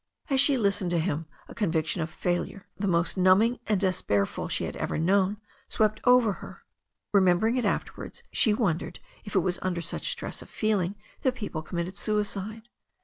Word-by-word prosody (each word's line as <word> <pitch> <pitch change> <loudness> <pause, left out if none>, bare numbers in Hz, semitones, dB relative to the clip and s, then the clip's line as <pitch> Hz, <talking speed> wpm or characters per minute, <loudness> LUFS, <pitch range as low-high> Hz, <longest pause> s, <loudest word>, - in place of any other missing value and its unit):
As 265 -1 +4
she 280 -2 +4
listened 200 -4 +1
to 175 - +1
him 160 -1 -1 0.2
a - - -10
conviction 165 -5 0
of 160 - -2
failure, 175 +4 -2
the 200 +1 -2
most 170 0 +1
numbing 190 +6 +4
and 210 -3 +2
despairful 165 - 0
she - - -1
had - - -4
ever - - -2
known, 190 +4 +2 0.3
swept 215 0 +1
over 245 -4 +5
her. - - -11 0.5
Remembering 195 +4 +4
it 250 - 0
afterwards, - - -3
she 220 - +3
wondered 175 -6 -1 0.3
if 205 - -7
it 190 - +5
was 180 +1 -1
under 185 -2 -1
such 170 0 -3
stress - - -4
of - - -12
feeling 205 -3 0 0.3
that 260 -2 +1
people 200 -9 -4
committed 175 +3 -4
suicide. 210 0 -2
195 Hz, 175 wpm, -27 LUFS, 175-215 Hz, 0.5 s, over